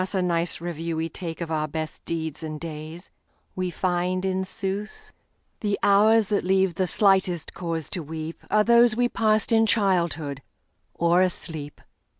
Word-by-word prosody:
a -, -, +2 dB
nice 170 Hz, -1 st, 0 dB
review 165 Hz, -1 st, -4 dB
we 160 Hz, +1 st, -1 dB
takeOf 165 Hz, 0 st, -6 dB
our 155 Hz, -1 st, 0 dB
best 155 Hz, +1 st, -5 dB
deeds 160 Hz, -2 st, -3 dB
and 155 Hz, -1 st, -5 dB
days, 160 Hz, +2 st, -8 dB, 0.4 s
we 185 Hz, -1 st, -1 dB
find, 180 Hz, +1 st, -1 dB
in 190 Hz, 0 st, 0 dB
sooth, 195 Hz, +2 st, -5 dB, 0.5 s
The 205 Hz, -2 st, 0 dB
hours 210 Hz, +1 st, +5 dB
that 205 Hz, -, +1 dB
leave 190 Hz, -1 st, +2 dB
the 185 Hz, +2 st, 0 dB
slightest 190 Hz, -4 st, +2 dB
cause 165 Hz, -4 st, -3 dB
to 175 Hz, -, -3 dB
weepAre 160 Hz, +7 st, -2 dB
those 235 Hz, -1 st, +5 dB
we 245 Hz, +1 st, +2 dB
passed 215 Hz, -2 st, +1 dB
in 225 Hz, 0 st, +4 dB
childhood 170 Hz, -9 st, +1 dB, 0.5 s
or 170 Hz, +1 st, +3 dB
asleep! 160 Hz, -5 st, -3 dB
180 Hz, 150 wpm, -25 LUFS, 160-200 Hz, 0.5 s, hours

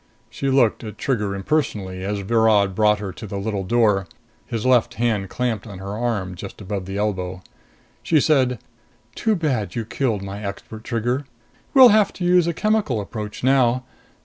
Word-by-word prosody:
She 135 Hz, -, -2 dB
looked 130 Hz, -5 st, +3 dB
at 110 Hz, -2 st, -8 dB
Trigger 105 Hz, -7 st, -1 dB
impersonally 95 Hz, -5 st, -2 dB
as 100 Hz, +1 st, -2 dB
Virod 105 Hz, -2 st, +3 dB
brought 105 Hz, +1 st, +3 dB
her 100 Hz, -3 st, -6 dB
to 110 Hz, -, -9 dB
the 100 Hz, -, -5 dB
little 100 Hz, -1 st, -2 dB
door, 105 Hz, -3 st, +2 dB, 0.4 s
his 115 Hz, -1 st, -3 dB
left 125 Hz, -1 st, +3 dB
hand 110 Hz, -5 st, 0 dB
clamped 115 Hz, -3 st, -2 dB
on 100 Hz, -3 st, -8 dB
her 100 Hz, +2 st, -6 dB
arm 110 Hz, -5 st, -2 dB
just 95 Hz, +2 st, -9 dB
above 100 Hz, -2 st, -5 dB
the 95 Hz, +1 st, -4 dB
elbow. 95 Hz, -3 st, -2 dB, 0.6 s
She 160 Hz, -, +3 dB
said, 130 Hz, -4 st, +2 dB, 0.6 s
"Too 220 Hz, -1 st, +1 dB
bad 135 Hz, -, -1 dB
you 115 Hz, -2 st, -2 dB
killed 115 Hz, -4 st, -1 dB
my 100 Hz, +2 st, -6 dB
expert, 105 Hz, +2 st, -7 dB
Trigger! 120 Hz, +4 st, -1 dB, 0.5 s
We'll 260 Hz, -2 st, +10 dB
have 215 Hz, -1 st, +4 dB
to 180 Hz, -, -6 dB
use 180 Hz, -1 st, +4 dB
a 170 Hz, -, 0 dB
chemical 210 Hz, -, +1 dB
approach 105 Hz, +1 st, -6 dB
now. 130 Hz, -1 st, +3 dB
110 Hz, 175 wpm, -22 LUFS, 100-130 Hz, 0.6 s, We'll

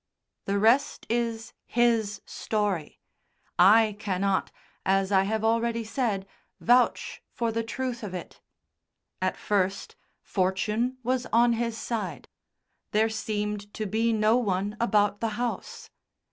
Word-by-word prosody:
The 200 Hz, +1 st, 0 dB
rest 230 Hz, +7 st, +3 dB
is 230 Hz, -1 st, -1 dB
his 225 Hz, -4 st, +1 dB
story. 205 Hz, -7 st, -2 dB, 0.6 s
I 210 Hz, +3 st, +6 dB
cannot, 195 Hz, -1 st, 0 dB, 0.3 s
as 195 Hz, +1 st, +2 dB
I 190 Hz, -1 st, +4 dB
have 220 Hz, +2 st, -1 dB
already 230 Hz, +1 st, +1 dB
said, 220 Hz, -4 st, -1 dB, 0.3 s
vouch 245 Hz, +1 st, +2 dB
for 230 Hz, -1 st, -2 dB
the 230 Hz, +1 st, -1 dB
truth 245 Hz, +1 st, -4 dB
of 200 Hz, -4 st, -5 dB
it. 175 Hz, -, -8 dB, 0.8 s
At -, -, 0 dB
first, 195 Hz, -2 st, -1 dB, 0.3 s
fortune 210 Hz, +6 st, 0 dB
was 255 Hz, +1 st, 0 dB
on 235 Hz, +1 st, +5 dB
his 230 Hz, 0 st, -2 dB
side. 230 Hz, -2 st, -4 dB, 0.6 s
There 220 Hz, +1 st, +2 dB
seemed 210 Hz, -1 st, -3 dB
to 215 Hz, -, -3 dB
be 225 Hz, +3 st, +1 dB
no 220 Hz, +1 st, +3 dB
one 205 Hz, -3 st, -1 dB
about 205 Hz, -3 st, +2 dB
the 230 Hz, -, +1 dB
house. 240 Hz, -1 st, -4 dB
220 Hz, 125 wpm, -27 LUFS, 200-235 Hz, 0.8 s, I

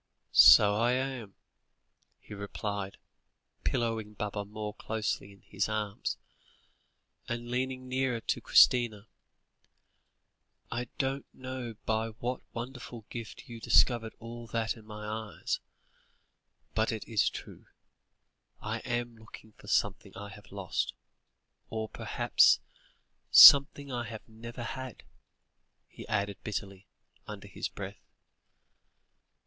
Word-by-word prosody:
"So 105 Hz, -1 st, +9 dB
I 120 Hz, +3 st, +2 dB
am," 130 Hz, -5 st, -3 dB, 0.8 s
he -, -, -12 dB
replied, 100 Hz, -1 st, -5 dB, 0.7 s
pillowing 115 Hz, -4 st, -1 dB
Baba 105 Hz, 0 st, -3 dB
more 105 Hz, +1 st, -6 dB
closely 110 Hz, -2 st, -3 dB
in 100 Hz, -, -19 dB
his 100 Hz, +1 st, -2 dB
arms, 105 Hz, -2 st, -2 dB, 1.1 s
and 120 Hz, 0 st, -4 dB
leaning 130 Hz, +1 st, -2 dB
nearer 130 Hz, -2 st, 0 dB
to -, -, -2 dB
Christina. 115 Hz, -4 st, +5 dB, 1.7 s
"I 120 Hz, +1 st, -2 dB
don't 135 Hz, +1 st, -2 dB
know 130 Hz, -3 st, -6 dB
by 110 Hz, 0 st, 0 dB
what 120 Hz, +3 st, -4 dB
wonderful 120 Hz, -2 st, -7 dB
gift 115 Hz, -3 st, -8 dB
you 115 Hz, -1 st, -9 dB
discovered 115 Hz, -1 st, +3 dB
all 115 Hz, +1 st, -9 dB
that 115 Hz, -1 st, -1 dB
in 110 Hz, -2 st, -15 dB
my 105 Hz, 0 st, -8 dB
eyes 110 Hz, 0 st, -3 dB, 1.1 s
but 110 Hz, 0 st, +1 dB
it 110 Hz, -2 st, -5 dB
is 110 Hz, -3 st, +2 dB
true. -, -, -10 dB, 0.9 s
I 110 Hz, +2 st, -3 dB
am 120 Hz, 0 st, -3 dB
looking 110 Hz, 0 st, -14 dB
for -, -, -18 dB
something -, -, 0 dB
I 100 Hz, +1 st, -7 dB
have 100 Hz, +1 st, -14 dB
lost, 100 Hz, -2 st, -2 dB, 0.7 s
or 110 Hz, -1 st, -3 dB
perhaps -, -, +3 dB, 0.7 s
something 140 Hz, 0 st, +9 dB
I 120 Hz, -1 st, -2 dB
have 110 Hz, -1 st, -9 dB
never 115 Hz, +2 st, -8 dB
had," 130 Hz, 0 st, -6 dB, 0.8 s
he -, -, -12 dB
added 100 Hz, -1 st, -2 dB
bitterly, 100 Hz, -2 st, -5 dB, 0.4 s
under -, -, -8 dB
his -, -, -4 dB
breath. -, -, -8 dB
115 Hz, 115 wpm, -30 LUFS, 105-120 Hz, 1.7 s, So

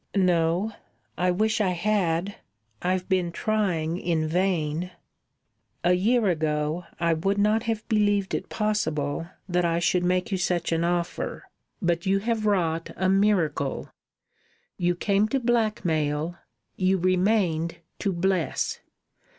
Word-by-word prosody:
"No. 180 Hz, +2 st, +2 dB, 0.4 s
I 180 Hz, +1 st, +1 dB
wish 215 Hz, +4 st, +1 dB
I 185 Hz, -3 st, +2 dB
had. 185 Hz, -1 st, 0 dB, 0.4 s
I've 185 Hz, 0 st, 0 dB
been 185 Hz, -3 st, +1 dB
trying 180 Hz, -5 st, 0 dB
in 165 Hz, -4 st, 0 dB
vain." 175 Hz, -1 st, 0 dB, 0.9 s
"A 180 Hz, -, +4 dB
year 220 Hz, +5 st, +2 dB
ago 155 Hz, 0 st, 0 dB
I 170 Hz, 0 st, +2 dB
would 195 Hz, +5 st, 0 dB
not 210 Hz, +2 st, +3 dB
have 220 Hz, -1 st, -2 dB
believed 205 Hz, -3 st, +1 dB
it -, -, -3 dB
possible 165 Hz, -8 st, -1 dB, 0.2 s
that 180 Hz, -1 st, +1 dB
I 170 Hz, -1 st, +1 dB
should 175 Hz, +1 st, +2 dB
make 180 Hz, +4 st, 0 dB
you 190 Hz, -, 0 dB
such 175 Hz, -2 st, 0 dB
an 165 Hz, 0 st, +1 dB
offer, 175 Hz, 0 st, -2 dB, 0.4 s
but 170 Hz, 0 st, 0 dB
you 195 Hz, +1 st, +3 dB
have 220 Hz, +1 st, -1 dB
wrought 165 Hz, -5 st, +1 dB
a 185 Hz, 0 st, +1 dB
miracle. 190 Hz, -8 st, +1 dB, 0.9 s
You 175 Hz, 0 st, +1 dB
came 200 Hz, +3 st, +2 dB
to 270 Hz, +5 st, 0 dB
blackmail, 175 Hz, -, 0 dB, 0.4 s
you 190 Hz, 0 st, +2 dB
remained 185 Hz, -2 st, +1 dB, 0.2 s
to 200 Hz, -, 0 dB
bless. 180 Hz, -3 st, 0 dB
180 Hz, 130 wpm, -26 LUFS, 170-205 Hz, 0.9 s, A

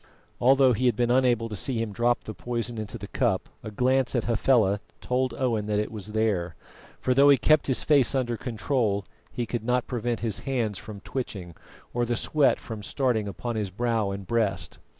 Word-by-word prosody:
Although 130 Hz, 0 st, +5 dB
he 125 Hz, +3 st, +1 dB
had 120 Hz, -, +2 dB
been 120 Hz, +1 st, +1 dB
unable 125 Hz, -3 st, +3 dB
to 105 Hz, -, -6 dB
see 115 Hz, +7 st, -2 dB
him 115 Hz, -1 st, -2 dB
drop 120 Hz, +2 st, +1 dB
the 110 Hz, -, -6 dB
poison 120 Hz, -1 st, -4 dB
into 110 Hz, -2 st, -5 dB
the -, -, -8 dB
cup, -, -, 0 dB
a -, -, -6 dB
glance 130 Hz, +4 st, +1 dB
at 120 Hz, -, +1 dB
Hafela 115 Hz, -4 st, +2 dB, 0.2 s
told 130 Hz, +1 st, -1 dB
Owen 115 Hz, -5 st, -1 dB
that 105 Hz, -1 st, 0 dB
it 105 Hz, -, -1 dB
was 105 Hz, -1 st, -7 dB
there; 100 Hz, -6 st, 0 dB, 0.4 s
for 130 Hz, -, +1 dB
though 140 Hz, +2 st, +6 dB
he 140 Hz, -, +7 dB
kept 155 Hz, +1 st, +3 dB
his 130 Hz, -, +1 dB
face 140 Hz, -4 st, +4 dB
under 120 Hz, -3 st, 0 dB
control, 110 Hz, -3 st, -1 dB, 0.3 s
he 120 Hz, -, -3 dB
could 115 Hz, -1 st, -4 dB
not 125 Hz, +1 st, +1 dB
prevent 120 Hz, -2 st, -2 dB
his 110 Hz, -3 st, -1 dB
hands 115 Hz, -7 st, -2 dB
from 105 Hz, -2 st, -9 dB
twitching 100 Hz, -9 st, -5 dB, 0.4 s
or 120 Hz, -, 0 dB
the 120 Hz, 0 st, 0 dB
sweat 150 Hz, +3 st, +2 dB
from 110 Hz, -2 st, -7 dB
starting 115 Hz, -2 st, 0 dB
upon 120 Hz, +4 st, -4 dB
his 105 Hz, -3 st, -2 dB
brow 115 Hz, +1 st, 0 dB
and 100 Hz, 0 st, -5 dB
breast. 100 Hz, -6 st, -1 dB
115 Hz, 200 wpm, -26 LUFS, 105-125 Hz, 0.4 s, he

